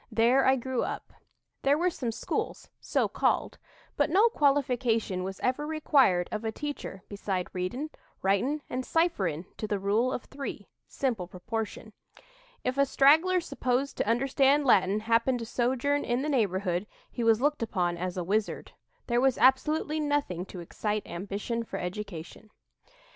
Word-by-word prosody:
There 245 Hz, +4 st, +4 dB
I 265 Hz, -, +6 dB
grew 260 Hz, 0 st, -2 dB
up. -, -, -5 dB, 0.5 s
There 280 Hz, +2 st, +3 dB
were 355 Hz, +3 st, +1 dB
some 245 Hz, -7 st, -3 dB
schools, 225 Hz, -, -4 dB
so -, -, 0 dB
called; -, -, 0 dB, 0.4 s
but 290 Hz, -, +2 dB
no 405 Hz, +8 st, +5 dB
qualification 250 Hz, -, +1 dB
was 190 Hz, 0 st, -5 dB
ever 275 Hz, +4 st, 0 dB
required 275 Hz, -, +3 dB
of 215 Hz, +1 st, -3 dB
a 220 Hz, -, -1 dB
teacher 280 Hz, -8 st, -6 dB
beside 195 Hz, -3 st, -3 dB
readin', 245 Hz, +12 st, -3 dB, 0.3 s
writin', 245 Hz, +10 st, +1 dB
and 255 Hz, +1 st, -3 dB
cipherin' 195 Hz, -, 0 dB
to 215 Hz, -, -3 dB
the 205 Hz, -, 0 dB
Rule 210 Hz, +6 st, +1 dB
of 250 Hz, -, -3 dB
Three 275 Hz, 0 st, -6 dB, 0.2 s
(simple 230 Hz, -10 st, -2 dB
proportion). 220 Hz, +5 st, -5 dB, 0.7 s
If 255 Hz, +2 st, -1 dB
a 280 Hz, -, +6 dB
straggler 320 Hz, +8 st, +5 dB
supposed 265 Hz, -4 st, -1 dB
to -, -, 0 dB
understand 275 Hz, +4 st, +3 dB
Latin 200 Hz, -3 st, +4 dB
happened 230 Hz, +3 st, +2 dB
to 230 Hz, -, -5 dB
sojourn 260 Hz, +5 st, 0 dB
in 245 Hz, +2 st, 0 dB
the 305 Hz, -, -1 dB
neighborhood, 195 Hz, -7 st, 0 dB, 0.2 s
he 240 Hz, -, -3 dB
was 225 Hz, -1 st, +4 dB
looked 295 Hz, +2 st, +1 dB
upon 180 Hz, -6 st, 0 dB
as 180 Hz, +1 st, -4 dB
a 180 Hz, -, -1 dB
wizard. 210 Hz, +4 st, -1 dB, 0.3 s
There 240 Hz, 0 st, +1 dB
was 265 Hz, -1 st, +3 dB
absolutely 300 Hz, +4 st, +3 dB
nothing 290 Hz, -, -1 dB
to 180 Hz, -, -8 dB
excite 210 Hz, +5 st, -3 dB
ambition 205 Hz, +6 st, -4 dB
for 195 Hz, -, -6 dB
education." 190 Hz, +1 st, -6 dB
235 Hz, 155 wpm, -28 LUFS, 200-275 Hz, 0.7 s, I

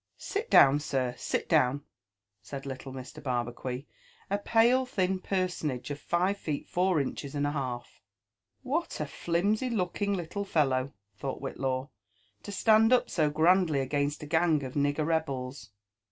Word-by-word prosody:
Sit 430 Hz, +4 st, -4 dB
down, 140 Hz, +1 st, +7 dB
sir, 130 Hz, -4 st, -1 dB
sit -, -, -2 dB
down," 130 Hz, +3 st, +3 dB, 0.6 s
said 135 Hz, +7 st, -7 dB
liltle 135 Hz, 0 st, -6 dB
Mr. 130 Hz, +3 st, -9 dB
Barbacuit, 125 Hz, 0 st, -3 dB, 0.5 s
a 200 Hz, -, +1 dB
pale 235 Hz, +5 st, +4 dB
thin 190 Hz, -7 st, 0 dB
personable 180 Hz, -9 st, -2 dB
of 145 Hz, -, -4 dB
five 185 Hz, +5 st, 0 dB
feet 150 Hz, -3 st, -4 dB
four 180 Hz, -2 st, +2 dB
inches 140 Hz, +1 st, -4 dB
and 145 Hz, 0 st, 0 dB
a 145 Hz, -, 0 dB
half. 130 Hz, -4 st, -5 dB, 0.3 s
" 110 Hz, -, -52 dB
What 330 Hz, +3 st, -1 dB
a 150 Hz, -, -1 dB
flimsy 200 Hz, -, 0 dB
looking 200 Hz, -1 st, -1 dB
little 180 Hz, +3 st, -4 dB
fellow," 135 Hz, -8 st, +1 dB, 0.3 s
thought 135 Hz, -1 st, -4 dB
Whitlaw, 135 Hz, 0 st, -3 dB, 0.3 s
" 105 Hz, -1 st, -39 dB
to -, -, -8 dB
stand 220 Hz, +3 st, +4 dB
up 255 Hz, -, +3 dB
so 155 Hz, -3 st, +2 dB
grandly 160 Hz, 0 st, +3 dB
against 145 Hz, +2 st, -1 dB
a -, -, -5 dB
gang 160 Hz, -1 st, +2 dB
of 130 Hz, -1 st, -6 dB
nigger 145 Hz, +1 st, +1 dB
rebels!" 135 Hz, -7 st, -2 dB
150 Hz, 155 wpm, -29 LUFS, 135-185 Hz, 0.6 s, down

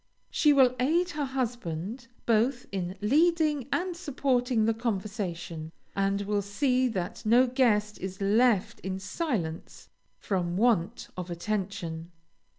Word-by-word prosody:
She 300 Hz, -, +4 dB
will 260 Hz, -3 st, +5 dB
aid 335 Hz, +8 st, +2 dB
her 295 Hz, -2 st, -2 dB
husband 235 Hz, -4 st, -3 dB, 0.2 s
both 240 Hz, +3 st, +2 dB
in 185 Hz, -1 st, -3 dB
leading 300 Hz, +3 st, +2 dB
and 360 Hz, 0 st, -1 dB
supporting 255 Hz, -8 st, +1 dB
the 225 Hz, -, +3 dB
conversation, 190 Hz, -7 st, -4 dB, 0.2 s
and 195 Hz, 0 st, +1 dB
will 205 Hz, 0 st, 0 dB
see 255 Hz, +6 st, +1 dB
that 190 Hz, -5 st, -4 dB
no 235 Hz, +4 st, +5 dB
guest 220 Hz, -5 st, +1 dB
is 190 Hz, 0 st, -6 dB
left 210 Hz, +1 st, +2 dB
in 190 Hz, 0 st, -4 dB
silence 190 Hz, -, -4 dB, 0.3 s
from 180 Hz, -3 st, -1 dB
want 220 Hz, -2 st, +1 dB
of 180 Hz, -1 st, -5 dB
attention. 175 Hz, -3 st, -3 dB
220 Hz, 125 wpm, -28 LUFS, 190-255 Hz, 0.3 s, will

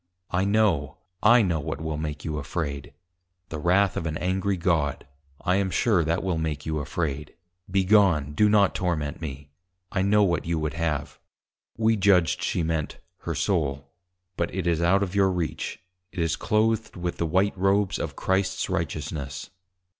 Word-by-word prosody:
I 90 Hz, +2 st, +1 dB
know, 100 Hz, -10 st, +1 dB, 0.2 s
I 120 Hz, +2 st, +6 dB
know 85 Hz, -5 st, 0 dB
what 70 Hz, 0 st, -4 dB
will 80 Hz, -1 st, -3 dB
make 75 Hz, -1 st, -5 dB
you 75 Hz, -2 st, -2 dB
afraid; 70 Hz, -2 st, -4 dB, 0.6 s
the 80 Hz, -, -5 dB
wrath 90 Hz, +4 st, +3 dB
of 80 Hz, -, -2 dB
an 80 Hz, -1 st, -2 dB
Angry 95 Hz, +2 st, 0 dB
God, 85 Hz, -5 st, 0 dB, 0.3 s
I 90 Hz, -1 st, +1 dB
am 100 Hz, -1 st, +1 dB
sure 95 Hz, 0 st, +2 dB
that 80 Hz, +2 st, 0 dB
will 90 Hz, -4 st, -1 dB
make 75 Hz, -3 st, -3 dB
you 80 Hz, -1 st, -1 dB
afraid; 75 Hz, -1 st, -3 dB, 0.3 s
be 95 Hz, +1 st, +2 dB
gone, 90 Hz, -8 st, +4 dB
do 105 Hz, +7 st, +4 dB
not 105 Hz, -2 st, +4 dB
torment 85 Hz, -5 st, -2 dB
me, 70 Hz, -2 st, -7 dB, 0.4 s
I 95 Hz, -, 0 dB
know 105 Hz, +2 st, +4 dB
what 85 Hz, -5 st, +1 dB
you 85 Hz, 0 st, -1 dB
would 75 Hz, -1 st, -2 dB
have_ 75 Hz, -3 st, -2 dB, 0.6 s
(we 110 Hz, 0 st, +3 dB
judged 95 Hz, -4 st, +3 dB
she 85 Hz, -, 0 dB
meant, 80 Hz, -2 st, -2 dB, 0.3 s
her -, -, -1 dB
Soul) 70 Hz, -6 st, -1 dB, 0.5 s
_but 85 Hz, -, +1 dB
it 95 Hz, -2 st, -3 dB
is 85 Hz, -1 st, +1 dB
out 95 Hz, +4 st, +3 dB
of 95 Hz, -2 st, -4 dB
your 100 Hz, -1 st, +4 dB
reach; 90 Hz, -3 st, -3 dB, 0.3 s
it -, -, -16 dB
is 80 Hz, -2 st, +1 dB
cloathed 110 Hz, +1 st, 0 dB
with 90 Hz, -1 st, -3 dB
the 85 Hz, -, -1 dB
white 95 Hz, +5 st, +2 dB
Robes 95 Hz, +1 st, +1 dB
of -, -, -4 dB
Christ's 95 Hz, 0 st, 0 dB
Righteousness. 75 Hz, -3 st, -4 dB
85 Hz, 175 wpm, -26 LUFS, 75-95 Hz, 0.6 s, I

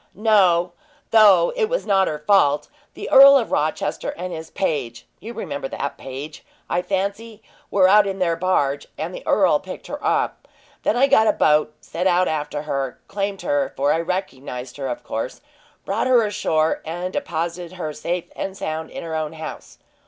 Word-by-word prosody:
"No, 185 Hz, -5 st, +3 dB, 0.4 s
though 205 Hz, -6 st, +6 dB
it 475 Hz, -3 st, +2 dB
was -, -, -1 dB
not 195 Hz, -2 st, +3 dB
her 150 Hz, -, -2 dB
fault. 150 Hz, -3 st, +2 dB, 0.3 s
The -, -, -6 dB
Earl 275 Hz, +1 st, +9 dB
of 235 Hz, -, -2 dB
Rochester 155 Hz, +1 st, -1 dB
and 180 Hz, +1 st, -5 dB
his 160 Hz, 0 st, -7 dB
page 130 Hz, -10 st, -3 dB
you 225 Hz, -, -8 dB
remember 150 Hz, -12 st, -5 dB
that 140 Hz, -, -5 dB
page, 135 Hz, +3 st, -8 dB, 0.2 s
I 175 Hz, -, 0 dB
fancy 200 Hz, +4 st, -3 dB, 0.3 s
were 190 Hz, -2 st, +4 dB
out 205 Hz, +1 st, +5 dB
in 195 Hz, 0 st, -3 dB
their 175 Hz, -3 st, +1 dB
barge, 145 Hz, -6 st, 0 dB
and -, -, -4 dB
the -, -, -7 dB
earl -, -, +4 dB
picked -, -, -9 dB
her -, -, -7 dB
up. -, -, -1 dB, 0.3 s
Then 225 Hz, -, +1 dB
I 265 Hz, -, +5 dB
got 220 Hz, -5 st, +4 dB
a -, -, +4 dB
boat, 150 Hz, 0 st, +2 dB
set 180 Hz, +3 st, -2 dB
out 180 Hz, 0 st, +3 dB
after 150 Hz, -1 st, -3 dB
her, 135 Hz, -4 st, -3 dB
claimed 200 Hz, -1 st, -3 dB
her 145 Hz, -1 st, 0 dB
for 140 Hz, +2 st, +2 dB
I 165 Hz, -, 0 dB
recognized 135 Hz, -8 st, -4 dB
her, 135 Hz, -2 st, -4 dB
of 125 Hz, -, -5 dB
course 115 Hz, +3 st, -4 dB, 0.5 s
brought 205 Hz, +6 st, -1 dB
her 250 Hz, -3 st, +5 dB
ashore, 160 Hz, -6 st, 0 dB
and 175 Hz, +3 st, -5 dB
deposited 170 Hz, +1 st, -3 dB
her 155 Hz, -4 st, -4 dB
safe 175 Hz, +3 st, -3 dB
and 195 Hz, 0 st, -5 dB
sound 160 Hz, -2 st, -4 dB
in -, -, -7 dB
her 165 Hz, -1 st, -6 dB
own 155 Hz, 0 st, -2 dB
house. 160 Hz, 0 st, -9 dB
175 Hz, 180 wpm, -22 LUFS, 150-200 Hz, 0.5 s, Earl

